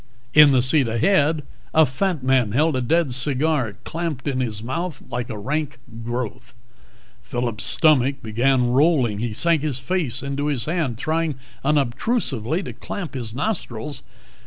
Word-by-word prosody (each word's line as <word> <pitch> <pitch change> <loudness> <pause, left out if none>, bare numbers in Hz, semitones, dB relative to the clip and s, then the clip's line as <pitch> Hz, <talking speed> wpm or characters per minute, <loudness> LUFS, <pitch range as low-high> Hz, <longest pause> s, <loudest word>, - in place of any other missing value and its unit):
In 150 -1 +9
the 130 -3 +3
seat 135 0 +3
ahead, 150 - +2 0.3
a 160 0 +7
fat 155 +3 -1
man 130 -5 +2
held 155 +3 +2
a 130 - 0
dead 155 +2 +1
cigar 135 - 0
clamped 160 -5 -4
in 135 -2 0
his 110 -4 -2
mouth 160 +5 -4
like 120 0 -3
a 110 - -5
rank 145 +7 -2 0.3
growth. 120 -1 -5 0.7
Phillip's 120 - -3
stomach 140 -4 +3
began 120 +3 +2
rolling; 130 -6 +3
he 115 0 -2
sank 165 +7 +1
his 145 -4 -2
face 135 -3 -1
into 140 +1 -2
his 135 -5 0
hand, 155 -8 -1
trying 160 +2 -1 0.3
unobtrusively 145 - 0
to - - -6
clamp 180 -6 -6
his 120 -4 -5
nostrils. 145 - -3
135 Hz, 150 wpm, -22 LUFS, 120-155 Hz, 0.7 s, In